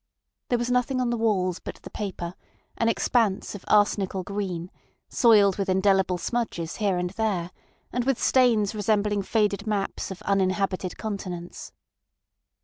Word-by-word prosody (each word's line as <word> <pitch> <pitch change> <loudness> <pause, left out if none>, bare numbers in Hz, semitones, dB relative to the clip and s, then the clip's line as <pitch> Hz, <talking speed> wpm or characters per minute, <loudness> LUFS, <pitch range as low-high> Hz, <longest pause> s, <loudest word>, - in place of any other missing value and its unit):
There 245 - +2
was 240 +1 -2
nothing 250 +1 +1
on 245 -1 +1
the - - +1
walls 195 -6 +1
but - - -7
the - - -12
paper, 185 -4 -5 0.4
an 230 - +1
expanse 225 -3 +1
of 205 - -8
arsenical 200 -2 +2
green, 185 -3 -4 0.4
soiled 210 -5 +5
with 195 -1 -1
indelible 190 -1 +3
smudges 175 -6 -3
here 200 -4 +1
and 180 0 -2
there, 195 -5 -1 0.4
and 245 - 0
with 270 -1 0
stains 230 -5 +3
resembling 210 -1 +1
faded 210 +1 0
maps 205 -2 -2
of 190 -2 -8
uninhabited 190 -1 0
continents. 185 -5 -6
200 Hz, 145 wpm, -26 LUFS, 185-225 Hz, 0.4 s, soiled